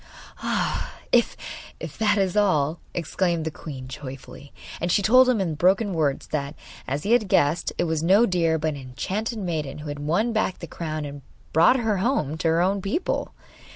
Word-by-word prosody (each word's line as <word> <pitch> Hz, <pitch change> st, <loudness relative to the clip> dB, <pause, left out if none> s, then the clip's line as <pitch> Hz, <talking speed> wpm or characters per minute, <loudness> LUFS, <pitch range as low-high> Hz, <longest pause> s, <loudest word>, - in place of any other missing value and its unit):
'Ah, -, -, -1 dB, 0.2 s
if -, -, +3 dB, 0.6 s
that 215 Hz, -1 st, +3 dB
is 190 Hz, -2 st, +1 dB
all,' 165 Hz, -7 st, +2 dB
exclaimed 170 Hz, 0 st, -1 dB
the 160 Hz, -, -2 dB
queen 135 Hz, -5 st, -8 dB
joyfully. 135 Hz, +1 st, -9 dB, 0.3 s
And 175 Hz, +1 st, -1 dB
she 200 Hz, -, +3 dB
told 255 Hz, +5 st, +6 dB
him 245 Hz, -4 st, +2 dB
in 180 Hz, -5 st, 0 dB
broken 190 Hz, +6 st, +2 dB
words 150 Hz, -5 st, -1 dB
that, 145 Hz, 0 st, -3 dB, 0.3 s
as 140 Hz, +3 st, -2 dB
he 210 Hz, -, -1 dB
had 235 Hz, -4 st, +4 dB
guessed, 150 Hz, -1 st, +2 dB
it -, -, +1 dB
was 160 Hz, -2 st, -1 dB
no 195 Hz, +8 st, +5 dB
deer 170 Hz, -5 st, +1 dB
but 155 Hz, 0 st, -1 dB
an 145 Hz, -, -4 dB
enchanted 190 Hz, -, -4 dB
maiden 160 Hz, -8 st, -3 dB
who 150 Hz, 0 st, -7 dB
had 145 Hz, 0 st, -5 dB
won 175 Hz, +11 st, 0 dB
back 215 Hz, -4 st, 0 dB
the -, -, -7 dB
crown 155 Hz, -2 st, -4 dB
and 145 Hz, 0 st, -8 dB, 0.3 s
brought 170 Hz, +11 st, +6 dB
her 220 Hz, -4 st, 0 dB
home 185 Hz, -, 0 dB
to 165 Hz, -, 0 dB
her 165 Hz, +2 st, +3 dB
own 195 Hz, +2 st, +1 dB
people. 205 Hz, -, -2 dB
170 Hz, 190 wpm, -24 LUFS, 150-200 Hz, 0.6 s, told